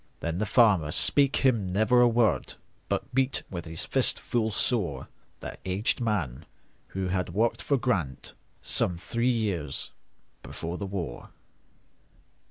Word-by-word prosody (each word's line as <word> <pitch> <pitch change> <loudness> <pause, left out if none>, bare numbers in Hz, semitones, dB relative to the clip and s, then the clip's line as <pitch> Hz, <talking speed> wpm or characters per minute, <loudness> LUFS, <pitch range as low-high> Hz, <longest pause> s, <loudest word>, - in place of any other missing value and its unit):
Then 85 +1 -2
the 110 - -1
farmer 100 -12 +4
spake 140 - +3
him 110 -8 +2
never 110 +6 +3
a 120 - +6
word, 115 -5 +1 0.3
But - - -2
beat 135 +1 +2
with 85 -2 -5
his 80 0 -2
fist - - +2
full 115 -2 -1
soreThat 100 - -3
aged 95 +6 0
man, 95 - -2 0.4
who 95 -1 -3
had 90 -1 -2
worked 115 +3 +1
for 140 - +1
GrantSome 90 - -1
three 115 +6 -1
years 100 - -2 0.5
before 85 +2 -6
the 100 - -4
war. 90 -10 -5
100 Hz, 130 wpm, -27 LUFS, 85-120 Hz, 0.5 s, a